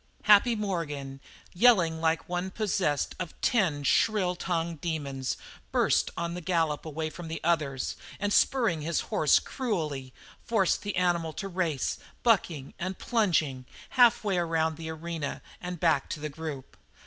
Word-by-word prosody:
Happy 210 +3 +6
Morgan, 150 -10 -3 0.3
yelling 175 -6 +4
like 160 0 +1
one 180 +1 -2
possessed 185 -8 0
of 175 -3 -6
ten 170 -11 +1
shrill 185 +3 +2
tongued 170 -3 -2
demons, 140 -6 -3 0.3
burst - - +2
on 170 0 -2
the 180 - -5
gallop 165 -4 0
away 155 +1 -3
from 165 +2 -8
the 160 - -4
others, 150 -6 0 0.2
and 205 0 0
spurring 230 - +3
his 165 +3 0
horse - - +5
cruelly, 155 - -3 0.3
forced 205 -6 +1
the 205 -1 -4
animal 175 -3 +1
to 195 - -5
race, 175 -7 -1 0.2
bucking 170 - +1
and 185 +2 -3
plunging, 160 - 0 0.2
half 240 -3 +5
way 195 -4 +1
around 160 -2 0
the 160 +1 -7
arena 160 -2 -4 0.2
and 180 -1 -5
back 165 -2 +2
to - - -4
the 155 +1 -4
group. 145 -3 -7
170 Hz, 150 wpm, -28 LUFS, 155-190 Hz, 0.3 s, Happy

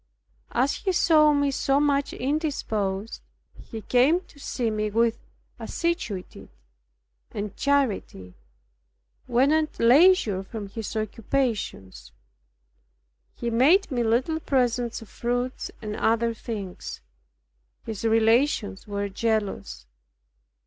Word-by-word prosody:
As 265 +3 +1
he 380 - -1
saw 310 -3 +5
me 285 -1 +2
so 275 +1 +1
much 285 -1 +1
indisposed, 225 -8 -2 0.3
he 225 -2 -9
came 265 +8 +3
to 325 -5 -20
see 240 -4 -2
me 215 0 -1
with 230 +2 +1 0.4
assiduity 335 - -4 0.8
and 205 -1 -5
charity, 230 - -1 0.9
when 255 +4 +3
at 310 0 +1
leisure 245 - +5
from 205 +1 -7
his 225 +2 -6
occupations. 220 - -3 1.2
He 235 -1 -3
made 305 - +4
me 245 -2 0
little 245 +8 +1
presents 245 -5 0
of - - -15
fruits 245 +2 -3
and 210 -1 -4
other 230 +1 +1
things. 210 -5 -7 0.8
His 220 -2 -5
relations 225 -1 +2
were 200 0 -2
jealous. 200 - -2
235 Hz, 105 wpm, -25 LUFS, 215-280 Hz, 1.2 s, saw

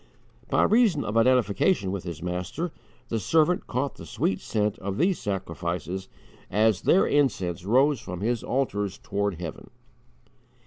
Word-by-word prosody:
By - - +3
reason 215 -10 +4
of 105 - -3
identification 115 - +3
with 95 -2 -4
his 85 -2 -6
Master, 90 - -3 0.4
the 115 - -1
servant 160 - +2
caught 130 +3 -2
the - - -9
sweet 95 - -1
scent 105 -2 -1
of 100 +1 -4
these 180 +5 +2
sacrifices 90 -1 -3 0.4
as 105 -1 +2
their 190 - +4
incense 95 - +1
rose 130 +5 +3
from 90 -4 -6
His 115 +1 0
altars 105 -7 -1
toward 100 -2 -2
heaven. 85 -3 -7
105 Hz, 140 wpm, -26 LUFS, 95-135 Hz, 0.4 s, reason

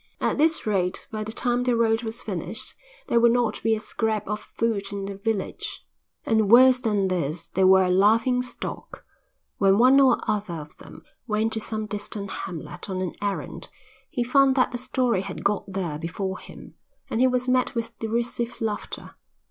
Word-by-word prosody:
At - - 0
this 320 +2 +3
rate 190 -4 -1
by 215 -1 -3
the 215 - -6
time 245 +1 0
the 250 -1 +1
road 225 -1 +2
was 225 +1 -5
finished - - -4 0.3
there 235 - +3
would 235 0 +5
not 240 -3 0
be 225 0 +2
a - - -4
scrap 215 0 -2
of 210 +1 -2 0.2
food 210 -4 0
in 200 -1 -4
the 200 - -5
village. 200 0 -3 0.4
And 220 -3 +2
worse 255 +2 +7
than 205 -4 +1
this, 170 -3 -2
they 190 - +1
were 190 0 +6
a 180 - +1
laughing 225 +6 +4
stock; 250 - -7 0.5
when 195 -1 +4
one 255 +4 +6
or 260 -3 +5
other 210 -5 -1
of 150 -1 -9
them - - -13 0.2
went 220 0 0
to 220 - -2
some 215 0 -3
distant 205 -1 -5
hamlet 175 +2 -6
on 185 -1 -2
an 180 - -3
errand 200 -1 -4 0.4
he 245 -6 -1
found 270 +2 +4
that 255 -2 +3
the 245 - -3
story 250 -5 0
had - - -7
got 205 0 0
there 175 -6 -3
before 185 +3 -4
him, - - -12 0.3
and 225 - -2
he 260 - +6
was 250 0 0
met 255 -1 +1
with 230 0 -4
derisive 235 +1 -2
laughter. 220 -2 -4
220 Hz, 190 wpm, -25 LUFS, 195-240 Hz, 0.5 s, worse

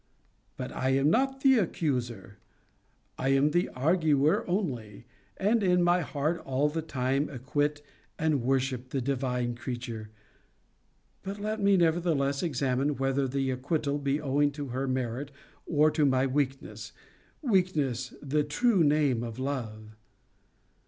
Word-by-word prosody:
But - - -5
I 130 - -1
am 140 +3 +3
not 270 +4 +1
the 265 -3 +5
accuser. 125 - -2 0.8
I 135 - 0
am 140 +2 +3
the 175 +2 +1
arguer 150 0 +2
only, 125 - -3 0.3
and, 215 +4 +2
in 180 -2 +3
my 175 +1 +4
heart, 155 +2 -1
all 135 +3 +1
the 160 +2 -3
time 135 -1 -1
acquit 145 +2 -2 0.3
and 155 -4 +1
worship 130 0 -1
the 135 - -2
divine 125 -2 -1
creature. 120 -3 -6 1.1
'But 200 +2 -6
let 215 +1 -2
me, 200 -1 +4
nevertheless, 160 -5 +1
examine, 140 -2 0
whether 135 0 0
the 135 0 -1
acquital 145 +2 -1
be 140 +1 +1
owing 145 0 +2
to 145 -2 -6
her 130 +2 -2
merit, 130 +1 -2 0.4
or 155 -1 +4
to 155 - +1
my 130 -2 +3
weakness 135 0 -3 0.5
Weakness 155 - +1
the 150 +2 +1
true 185 +6 +2
name 145 -5 +2
of 115 -1 -6
love!' 110 -6 -5
140 Hz, 135 wpm, -29 LUFS, 130-160 Hz, 1.1 s, the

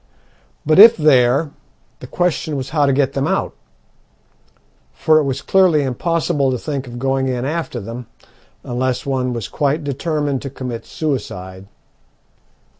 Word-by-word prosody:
But 155 +4 +3
if 225 +3 +9
there, 140 -1 +3 0.5
the 125 - -10
question 165 -1 -1
was 135 -1 -5
how 150 -2 +2
to - - +3
get 135 0 +1
them 135 0 -1
out; - - -1 1.4
for 155 0 +3
it 150 - 0
was 135 0 -3
clearly 180 -6 +3
impossible 150 +2 0
to 130 - -1
think 140 0 -5
of 120 0 -8
going 135 +1 0
in 125 -1 -2
after 155 -4 -3
them 115 +3 -8 0.6
unless 125 +1 -2
one 130 -2 -1
was 115 -4 -4
quite 150 +1 -1
determined 145 -1 -2
to 140 - -5
commit 125 -3 -7
suicide. 95 - -5
135 Hz, 145 wpm, -18 LUFS, 125-155 Hz, 1.4 s, if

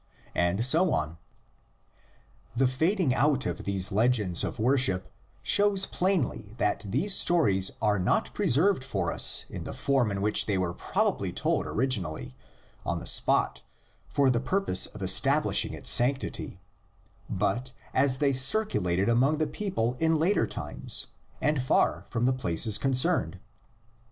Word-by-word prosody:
And 90 +6 +1
so 165 +6 +4
on. 80 +2 -3 1.4
The 135 +3 +2
fading 160 +4 0
out 140 +2 +1
of 85 -1 -5
these 95 -1 -1
legends 105 -4 +1
of - - -4
worship 110 -7 +1 0.3
shows 200 -2 +3
plainly 135 - -2
that 105 +1 -1
these 155 - +2
stories 100 - +2
are 105 -2 +1
not 90 - 0
preserved 160 +3 +1
for 95 -9 -3
us - - +3
in - - -8
the - - -7
form 135 -5 0
in 100 -1 -4
which 105 +1 +3
they 100 -3 0
were 90 -2 -2
probably - - -2
told - - -1
orig 130 +4 -1
inally 80 - -2 0.5
on - - -2
the - - -8
spot - - +2 0.5
for 140 -2 +2
the 120 - 0
purpose 185 - +1
of - - -10
establishing - - +2
its - - -2
sanctity, 130 +3 0 0.7
but 120 +6 -2 0.2
as 130 0 +1
they 140 0 +1
circulated 125 - +1
among 130 +6 +2
the 155 - 0
people 150 - -3
in 160 0 +2
later 180 +6 +1
times - - -4 0.3
and 150 -3 0
far 130 - 0
from 120 0 -1
the 130 - +2
places 105 -2 +2
concerned. 130 0 0
125 Hz, 145 wpm, -27 LUFS, 100-145 Hz, 1.4 s, so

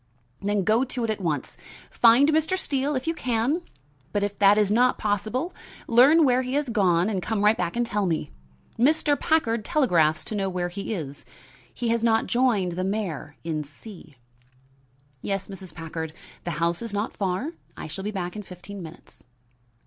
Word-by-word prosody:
"Then 205 0 0
go 220 +6 +3
to 255 -2 -3
it 225 - 0
at 210 - -4
once. 155 -5 -2 0.3
Find 240 +5 +6
Mr. 315 +4 +2
Steele 280 -4 -1
if 255 - -2
you 330 - 0
can, 255 +3 0 0.5
but 205 +2 0
if 205 0 -2
that 200 +1 +6
is 210 -2 +3
not 250 +3 +3
possible, 215 - -1 0.3
learn 275 +7 +6
where 255 -1 +3
he 255 +1 -3
has 290 -3 0
gone 185 -6 +3
and 200 -4 -1
come 210 +1 -1
right 210 +1 +6
back 175 -1 -2
and 240 0 +1
tell 210 -4 -1
me. 160 -3 -2 0.5
Mr. 295 +3 +3
Packard 235 -9 +1
telegraphs 175 - +2
to - - -6
know 195 -2 -1
where 180 -1 -2
he 195 +4 -5
is. 145 -6 -7 0.5
He 235 -1 -3
has 230 0 +1
not 225 -1 +3
joined 235 -8 +2
the 180 +2 -3
mayor 185 -7 -3
in 155 -2 -2
C 155 +1 -13 0.5
." 135 +1 -36
"Yes, 195 -1 -3
Mrs. 190 -2 -9
Packard; 160 -1 -6 0.3
the 175 - -2
house 170 +1 0
is 230 -3 -4
not 205 +3 -2
far. 195 - -1 0.3
I - - -6
shall 160 +5 -6
be 210 - -2
back 180 -3 -4
in 210 - -4
fifteen 190 +1 -10
minutes." 165 0 -13
205 Hz, 185 wpm, -25 LUFS, 175-240 Hz, 0.5 s, Find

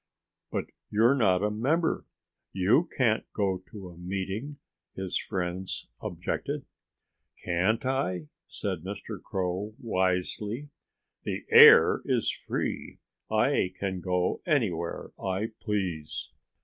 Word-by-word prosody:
"But - - -1 0.2
you're 115 +5 +5
not 100 -8 +3
a 105 - +1
member. 150 +10 0 0.5
You 105 - +3
can't 115 -4 +3
go 95 -3 0
to 100 -4 -9
a 85 - -13
meeting," 95 +10 -4 0.4
his 95 -1 -4
friends 95 -1 -3
objected. - - -3 0.8
"Can't 95 +7 +1
I?" 130 -10 0 0.3
said 95 -4 -3
Mr. 100 +2 -6
Crow 95 +3 -3
wisely. 105 +5 -1 0.5
"The - - -4
air - - +9
is - - +1
free. - - -4 0.3
I 90 0 +2
can 95 -2 -2
go 90 0 0
anywhere 100 - 0
I 95 +3 -1
please." 90 -8 -3
95 Hz, 110 wpm, -28 LUFS, 90-110 Hz, 0.8 s, air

